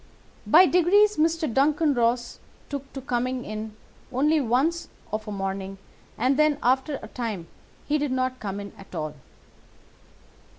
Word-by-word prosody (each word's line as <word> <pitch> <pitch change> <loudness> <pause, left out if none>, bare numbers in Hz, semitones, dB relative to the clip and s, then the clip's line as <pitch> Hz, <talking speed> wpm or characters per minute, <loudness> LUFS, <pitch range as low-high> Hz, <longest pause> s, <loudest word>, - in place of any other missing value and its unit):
By 355 +5 +8
degrees 395 +5 +4
Mr. 320 -3 +1
Duncan 295 +3 +3
Ross 240 0 0 0.3
took 280 -1 -6
to 270 - -6
coming 250 0 -2
in 215 0 -6 0.4
only 295 +4 +2
once 280 +8 0 0.2
of 215 +1 -3
a - - -4
morning, 195 0 -4 0.4
and 260 +4 +2
then, 305 -1 +4
after 265 +4 +2
a - - -7
time, 220 -7 -4 0.4
he 300 +1 +1
did 290 -2 -1
not 255 0 -1
come 200 -1 -4
in 200 0 -8
at 195 - -12
all. 155 -1 -3
255 Hz, 145 wpm, -25 LUFS, 220-300 Hz, 0.4 s, By